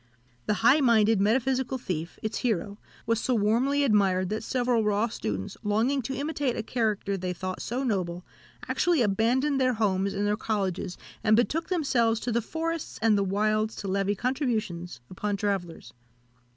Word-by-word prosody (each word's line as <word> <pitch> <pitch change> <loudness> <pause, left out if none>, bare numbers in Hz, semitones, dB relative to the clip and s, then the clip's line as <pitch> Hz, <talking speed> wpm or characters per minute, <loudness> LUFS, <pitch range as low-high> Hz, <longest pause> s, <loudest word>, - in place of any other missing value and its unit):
The 210 - +2
high 270 +6 +7
minded, 225 -4 +4
metaphysical 260 +4 +1
thief, 175 -8 -5
its 215 0 -2
hero, 205 -3 -1 0.3
was 230 -1 +1
so 255 - 0
warmly 240 +7 +2
admired, 195 -6 +2
that 215 +1 -2
several 245 -1 +1
raw 210 +2 +1
students, 100 - -4
longing 230 +7 +1
to 265 +3 -4
imitate 285 -2 -2
a 225 - -2
character 215 -4 -1
they 180 -1 -3
thought 185 +1 -5
so 250 +4 -2
noble, 180 -7 -2 0.4
actually 340 -7 +2
abandoned 245 +7 +1
their 255 -1 +3
homes 200 -2 0
and 205 +1 0
their 205 0 +2
colleges, 195 -5 -2 0.3
and 215 0 +5
betook 300 +8 +1
themselves 245 - +1
to 245 - -2
the 235 +1 +1
forests 325 +6 -4
and 225 -2 +5
the 200 - +2
wilds 215 +3 0
to 200 - -6
levy 195 +1 0
contributions 215 - -2
upon 205 +2 -2
travellers. 195 -5 -3
220 Hz, 165 wpm, -27 LUFS, 200-250 Hz, 0.4 s, high